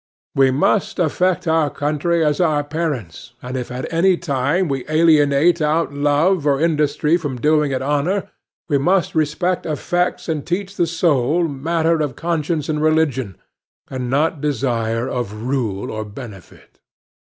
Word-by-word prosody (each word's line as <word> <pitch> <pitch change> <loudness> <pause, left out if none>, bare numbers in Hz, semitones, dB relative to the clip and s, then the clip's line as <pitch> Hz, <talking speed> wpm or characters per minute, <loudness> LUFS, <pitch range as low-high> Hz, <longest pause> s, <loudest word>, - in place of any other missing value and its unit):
"We 135 -1 +4
must 190 +9 +1
affect 180 +2 0
our 160 -2 +2
country 155 +4 0
as 150 +2 +1
our 155 -4 +2
parents, 145 - -4
And 125 +1 -5
if 125 -1 -4
at 125 +1 -4
any 180 +2 +3
time 155 +3 0
we 135 -3 -2
alienate 155 +1 +4
Out 155 0 +1
love 145 +4 +1
of 140 -1 +2
industry 155 0 +1
from 145 -7 -5
doing 150 +1 +2
it 130 0 -2
honor, 150 +8 -1 0.4
We 145 -3 +1
must 180 +5 +1
respect 165 +4 0
effects 175 +3 -1
and 155 -4 -2
teach 195 +2 -3
the 175 - +1
soul 165 -1 +1
Matter 160 +3 0
of 145 -5 -2
conscience 165 -2 -2
and 150 -1 -1
religion, 150 -9 +1 0.5
And 130 -2 -4
not 145 +2 0
desire 120 -4 -1
of 110 -3 -4
rule 120 -7 -2
or 110 0 -4
benefit." 105 -3 -12
150 Hz, 150 wpm, -19 LUFS, 135-165 Hz, 0.5 s, We